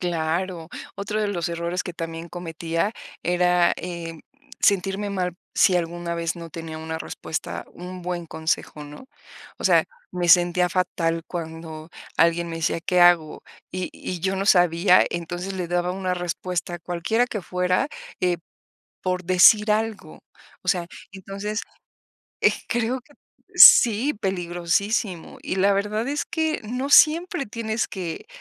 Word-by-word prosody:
Claro, 170 0 -2 0.3
otro 210 +2 -3
de 210 - +1
los 175 -5 -2
errores 170 +1 -2
que 180 - -6
también 165 0 -6
cometía 165 +3 -3 0.3
era, 180 0 +3
eh, 170 -2 -6 0.4
sentirme 200 +1 +1
mal 180 -3 -2 0.2
si 185 - +5
alguna 170 0 -3
vez 170 0 -2
no 170 -1 -9
tenía 160 0 -7
una 160 0 -5
respuesta 160 - -5
un 180 0 -9
buen 175 -1 -4
consejo, 160 -1 -3
¿no? 150 - -12 0.5
O - - -8
sea, - - +5 0.3
me 175 -1 -1
sentía 175 0 +5
fatal 165 -2 -1
cuando 160 -2 -7 0.3
alguien 170 +1 +3
me 165 - -5
decía: 165 +1 0
"¿Qué 180 +1 +1
hago?". 175 -3 +4 0.3
Y 185 -1 -3
y 180 -2 -6
yo 190 +1 -1
no 195 +1 -2
sabía, 180 0 +5
entonces, 175 +3 -4
le 180 -2 -3
daba 175 +1 0
una 185 -1 -2
respuesta, 175 0 -3
cualquiera 180 +8 0
que 210 -6 -5
fuera, 180 +9 0 0.3
eh, 180 -1 +2 0.7
por 180 -1 -1
decir 210 +4 +6
algo. 220 0 -3 0.4
O - - -8
sea, 175 -2 +1 0.3
entonces, 195 +3 -5 1.1
creo 240 +2 0
que 290 - -23 0.4
sí, 240 +6 +8
peligrosísimo. 185 0 -2
Y - - -3
la 195 +1 +3
verdad 210 +4 -1
es 290 +1 -2
que 320 -1 -1
no 250 +6 -3
siempre 315 0 +5
tienes 220 0 -2
que 185 - -6
180 Hz, 140 wpm, -24 LUFS, 170-200 Hz, 1.1 s, sí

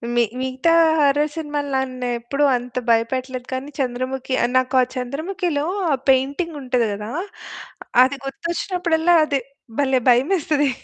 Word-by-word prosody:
మి 240 - +4 0.2
మిగతా 260 +5 0 0.3
హర్రర్ 290 +1 +3
సినిమాలు 295 -2 -3
నన్నెప్పుడూ 255 +1 -2
అంత 245 0 -5
భయపెట్టలేదు 250 +2 0
కానీ 260 +2 -4
'చంద్రముఖి' 260 0 -2
ఆహ్, 240 - +1
నాకు 255 +1 0
ఆ - - +4
'చంద్రముఖిలో' 305 +4 -2 0.3
ఆ - - +4 0.2
పెయింటింగుంటది 265 -3 +1
గదా! 210 +2 -6 0.9
అది 265 +2 +1
గుర్తొచ్చినప్పుడల్లా 340 +3 0
అది 285 -3 0 0.4
భలే! 265 -2 +2
భయమేస్తది. 295 +2 +2
270 Hz, 115 wpm, -21 LUFS, 255-300 Hz, 0.9 s, మి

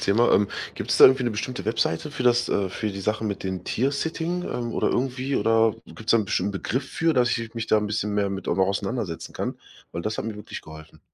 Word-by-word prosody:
Thema. 115 +5 +3
Ähm, 100 0 +4 0.3
gibt's - - -1
da - - +9
irgendwie 130 -1 +7
'ne 120 - +1
bestimmte 110 +2 -4
Webseite 110 - 0
für 135 - -4
das, 120 -1 +3
äh 95 -2 0
für 110 +3 -2
die 100 0 -6
Sache 110 +2 -1
mit 100 -2 -3
dem 95 -1 -3
Tiersitting, 160 - -1
ähm, 120 -1 -3
oder - - +1
irgendwie 130 +2 -1
oder 115 -1 +3
gibt's 115 +1 -2
da - - +6
'n 110 - +1
bestimmten 100 +1 0
Begriff 130 +7 -2
für, 165 0 +1
dass 125 -2 +3
ich 115 -1 -5
mich 115 -1 -3
da - - +4
'n 105 0 +1
bisschen 105 0 -1
mehr 100 -1 +1
mit 95 -1 -5
auch - - +1
noch 95 -1 +4
auseinandersetzen 100 -2 -3
kann? - - -3 0.3
Weil 85 - -3
das 110 +5 -2
hat - - -3
mir 115 - -3
wirklich 105 - -8
geholfen. 80 0 -13
110 Hz, 240 wpm, -25 LUFS, 100-125 Hz, 0.3 s, da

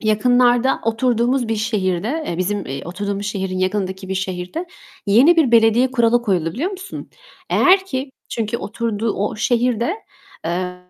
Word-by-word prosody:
yakınlarda 245 +3 +3
oturduğumuz 235 +2 +1
bir 225 - 0
şehirde, 210 -3 -1 0.2
-eee, 170 - -3
bizim, 200 +2 -1
eee, 135 - -5
oturduğumuz 200 +3 -4
şehrin 190 -3 -3
yakınındaki 190 0 -2
bir 190 - -2
şehirde 190 - -4 0.4
yeni 255 +12 +5
bir 310 -7 +3
belediye 230 +3 +4
kuralı 240 -1 +2
koyuldu, 180 -7 0
biliyor 315 - -2
musun? 385 -1 -8 0.4
Eğer 380 +1 +4
ki 265 -6 -4 0.2
Çünkü 225 0 -2
oturduğu 225 0 -2
o 205 +2 -2
şehirde, 240 - +1 0.5
eee 180 +2 -2
225 Hz, 145 wpm, -20 LUFS, 190-245 Hz, 0.5 s, yeni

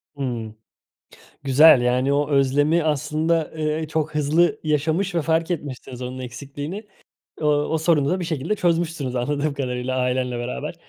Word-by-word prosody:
Imm. 120 -6 -4 0.9
Güzel, 140 0 +7
yani, 125 +3 +1
o 145 +1 0
özlemi 145 +4 +2
aslında, 155 +2 0
ııı, 155 0 -1
çok 155 -1 -2
hızlı 155 +4 +2
yaşamış 160 +5 0
ve 170 - +2
fark 160 +3 0
etmişsiniz 130 -5 -6
onun 125 +1 -5
eksikliğini. 145 - -7 0.5
O 150 - -1
o 150 +2 +1
sorunu 155 -3 +2
da 185 +1 0
bir 175 - -3
şekilde 160 +5 -2
çözmüşsünüz 165 -7 -1
anladığım 145 +4 -1
kadarıyla 130 -2 -3
ailenle 125 -1 0
beraber. 65 - -5
145 Hz, 145 wpm, -22 LUFS, 130-160 Hz, 0.9 s, Güzel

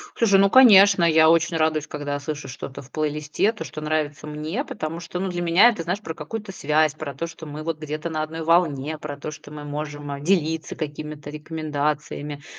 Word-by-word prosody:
Слушай, 200 -4 +4
ну, 195 - +6
конечно, 200 -7 +8
я 160 -1 +6
очень 165 0 +3
радуюсь, 155 -1 +1
когда 145 -1 -4
слышу 150 +1 -5
что-то 135 +1 -8
в 135 - -18
плейлисте, 150 +6 0
то, 220 - -7
что 155 - -8
нравится 150 -1 -2
мне, 155 - -3
потому 165 - -5
что, 175 +1 -6
ну, 190 0 -1
для 175 -1 -3
меня 175 +7 +6
это, 215 -8 -3
знаешь, 180 +5 -2
про 160 - -5
какую-то 195 +7 -6
связь, 155 -2 +2
про 155 -3 -7
то, 165 - -3
что 165 -1 -10
мы 150 +1 -7
вот 160 -1 -3
где-то 155 +2 -4
на 155 -1 -1
одной 160 +1 -4
волне, 155 -3 +1
про 145 -2 -6
то, 150 +2 -6
что 155 -1 -12
мы 150 0 -8
можем 145 -1 -5
делиться 160 -3 0
какими-то 150 -1 -6
рекомендациями, 150 -1 -3
155 Hz, 200 wpm, -23 LUFS, 150-170 Hz, -, конечно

